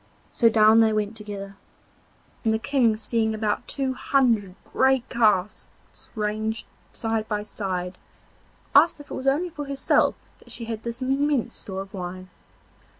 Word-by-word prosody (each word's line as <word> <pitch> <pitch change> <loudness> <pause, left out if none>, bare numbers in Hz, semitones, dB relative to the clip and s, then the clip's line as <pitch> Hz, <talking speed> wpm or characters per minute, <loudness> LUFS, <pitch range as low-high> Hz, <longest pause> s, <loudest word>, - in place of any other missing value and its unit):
So 230 - +4
down 220 0 +6
they 220 -1 +4
went 215 0 -1
together, 200 -2 -8 0.9
and 225 - +2
the 220 - +2
King 235 -2 +2
seeing 220 0 0
about 215 -1 -1
two 270 -2 -1
hundred 230 -9 +1 0.2
great 265 -1 +3
casks 210 -5 -1
ranged 215 +1 -2 0.3
side 225 -1 -2
by 210 -1 -2
side, 185 -3 -4 0.7
asked 300 +3 +5
if 290 - -13
it - - -3
was 260 +1 -4
only 325 +6 +1
for 295 -2 -6
herself 275 -1 +2 0.2
that - - -19
she 230 - -6
had 225 -1 -5
this 235 +2 -5
immense 275 0 +1
store 190 -1 -6
of 195 - -18
wine. 185 0 -7
220 Hz, 150 wpm, -25 LUFS, 210-260 Hz, 0.9 s, down